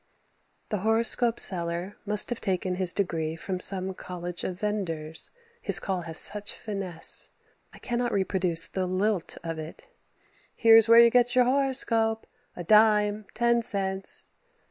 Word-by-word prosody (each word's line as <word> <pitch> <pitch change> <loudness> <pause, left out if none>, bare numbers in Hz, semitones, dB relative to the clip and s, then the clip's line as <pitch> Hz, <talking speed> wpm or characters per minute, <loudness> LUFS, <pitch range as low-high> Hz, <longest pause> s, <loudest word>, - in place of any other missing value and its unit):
The 210 - -2
horoscope 225 +3 +2
seller 175 +1 -1
must 210 +3 0
have 240 - -4
taken 185 -2 -1
his 180 -1 0
degree 165 -5 -2
from 185 +2 -5
some 190 0 -2
college 180 -1 -7
of 180 -1 -5
venders, 165 -7 -4 0.3
his - - +3
call 190 -2 -3
has 160 - -3
such 210 0 0
finesse. 195 -6 -1 0.4
I - - -15
cannot 240 0 -2
reproduce 185 -4 -1
the 185 +1 -3
lilt 190 0 -1
of 165 -1 -5
it 155 +1 -10 0.7
"Here's 225 -1 +6
where 230 0 +9
you 235 0 +5
get 245 +1 +3
your 250 -1 +5
horoscope, 245 -4 0 0.3
a 175 - -6
dime, 210 +1 +3
ten 235 0 +2
cents." 195 -3 -3
200 Hz, 145 wpm, -27 LUFS, 180-225 Hz, 0.7 s, where